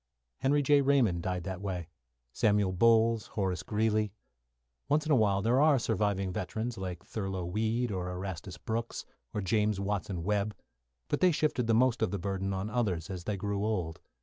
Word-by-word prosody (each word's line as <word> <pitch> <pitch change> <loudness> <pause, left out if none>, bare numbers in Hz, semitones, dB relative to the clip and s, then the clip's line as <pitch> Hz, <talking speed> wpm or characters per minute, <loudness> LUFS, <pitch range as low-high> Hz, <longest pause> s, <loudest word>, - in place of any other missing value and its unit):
Henry 145 +2 +2
J. 145 +1 +5
Raymond 130 -11 +3
died 90 -1 -2
that 95 +1 -5
way, 90 -4 -3 0.5
Samuel 105 -3 +2
Bowles, 115 +3 +4
Horace 95 -4 -2
Greeley. 110 +1 0 0.8
Once 150 +2 +2
in 155 - -1
a - - +6
while 100 -4 +2
there 120 +5 +3
are 150 -2 +5
surviving 100 -5 0
veterans 110 +6 -3
like 90 -3 -6
Thurlow 95 -4 -3
Weed, 110 +6 0
or 90 -2 -3
Erastus 90 0 -5
Brooks, 115 +1 -4 0.3
or 105 - -2
James 105 +1 +1
Watson 100 -3 -2
Webb 105 +2 0 0.5
but - - 0
they 185 -1 +5
shifted 150 -6 0
the 115 - +4
most 125 0 +3
of 110 - +2
the 100 - -2
burden 95 +1 -2
on 95 +1 -2
others 100 -8 -1
as 90 -2 -6
they 105 -2 -1
grew 100 +1 -2
old. 90 -7 -2
105 Hz, 175 wpm, -30 LUFS, 95-115 Hz, 0.8 s, a